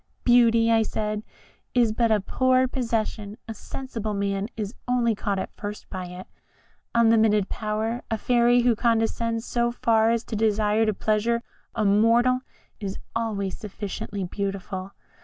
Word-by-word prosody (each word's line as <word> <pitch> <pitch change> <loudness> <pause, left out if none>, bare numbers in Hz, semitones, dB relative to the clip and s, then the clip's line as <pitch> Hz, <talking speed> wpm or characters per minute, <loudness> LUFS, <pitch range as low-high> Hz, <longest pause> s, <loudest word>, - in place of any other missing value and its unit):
'Beauty,' 230 -2 +5
I 225 0 +4
said, 215 -1 -2 0.5
'is 235 -3 +4
but 230 +1 +1
a 215 - +4
poor 255 +5 +2
possession 225 -4 -2
a 225 - -4
sensible 220 -2 -5
man 200 +1 -1
is 210 0 -3
only 245 -2 +2
caught 205 -1 -2
at 190 - -5
first 205 0 -7
by 185 -2 -5
it. 180 +1 -9 0.7
Unlimited 225 -3 +4
power 220 +2 -2
a 225 - 0
fairy 240 +1 +3
who 240 -2 +4
condescends 230 0 0
so 240 -1 0
far 225 -2 +2
as 230 0 +1
to 225 - -6
desire 215 0 +2
to 215 - +2
please 215 +2 0 0.5
a 215 - 0
mortal 230 +5 +4 0.4
is 195 -2 -4 0.2
always 205 -4 -2
sufficiently 200 -1 -5
beautiful.' 195 0 -4
220 Hz, 145 wpm, -25 LUFS, 205-235 Hz, 0.7 s, Beauty